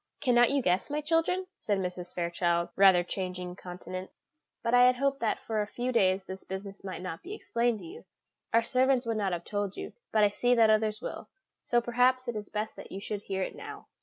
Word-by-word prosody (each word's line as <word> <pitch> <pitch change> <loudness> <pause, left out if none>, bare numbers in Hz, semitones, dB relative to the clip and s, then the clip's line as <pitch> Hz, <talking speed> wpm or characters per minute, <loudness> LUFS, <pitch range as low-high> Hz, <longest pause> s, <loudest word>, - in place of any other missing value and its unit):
"Cannot 240 -2 +4
you 280 -1 +1
guess, 180 +5 +1
my 295 +1 -1
children?" 330 +4 +1
said 205 -2 0
Mrs. 180 -1 -4
Fairchild, 170 0 0
rather 190 -2 +6
changing 180 -1 -4
countenance; 185 +1 -7 0.5
"but 230 - 0
I 245 0 +8
had 250 0 +5
hoped 275 +1 0
that 225 - 0
for 220 -2 -2
a 205 - -2
few 245 +4 -3
days 190 -4 +2
this 190 0 -8
business 195 +1 -7
might 185 -2 -6
not 175 -3 -5
be 390 +4 -7
explained 235 - 0
to - - -10
you. 380 +8 -11 0.5
Our 230 +1 +4
servants 260 0 +2
would 225 -1 -1
not 200 -3 0
have 175 -1 -3
told 205 -2 -3
you, - - -6 0.2
but 215 -1 +4
I 205 - +4
see 245 +4 +2
that 225 -2 +6
others 215 0 +1
will, - - -6 0.3
so 240 -1 +2
perhaps 250 +2 +2
it 240 - -2
is 210 -1 -5
best 215 +1 -3
that - - -10
you 195 - -5
should 205 0 -4
hear 190 -2 -2
it - - -4
now." - - -9
215 Hz, 220 wpm, -29 LUFS, 185-245 Hz, 0.5 s, I